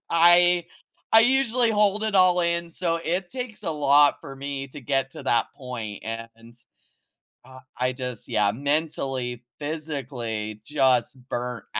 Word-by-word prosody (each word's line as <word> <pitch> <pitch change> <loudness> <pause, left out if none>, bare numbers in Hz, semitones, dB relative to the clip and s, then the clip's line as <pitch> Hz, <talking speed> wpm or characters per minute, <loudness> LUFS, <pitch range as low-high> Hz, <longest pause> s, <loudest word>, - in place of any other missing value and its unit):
I 175 +1 +5 0.5
I 225 - +9
usually 245 -1 +3
hold 210 -1 +2
it 215 -2 -1
all 180 -1 +5
in, 170 0 0
so 170 -1 -1
it 175 +3 -2
takes 250 -5 -5
a 175 - -1
lot 145 -1 +4
for 135 - -10
me 140 0 -5
to 145 +2 -9
get 135 +1 -1
to - - -10
that 115 - +2
point, 115 -6 -7
and, 115 +1 -7 0.9
uh, 130 0 -14 0.2
I 125 +1 0
just 125 -3 -6
yeah, 105 -1 +2
mentally, 135 -2 -2 0.2
physically 130 -9 -4
just 130 -3 +2
burnt 125 0 -4
140 Hz, 140 wpm, -24 LUFS, 125-175 Hz, 0.9 s, I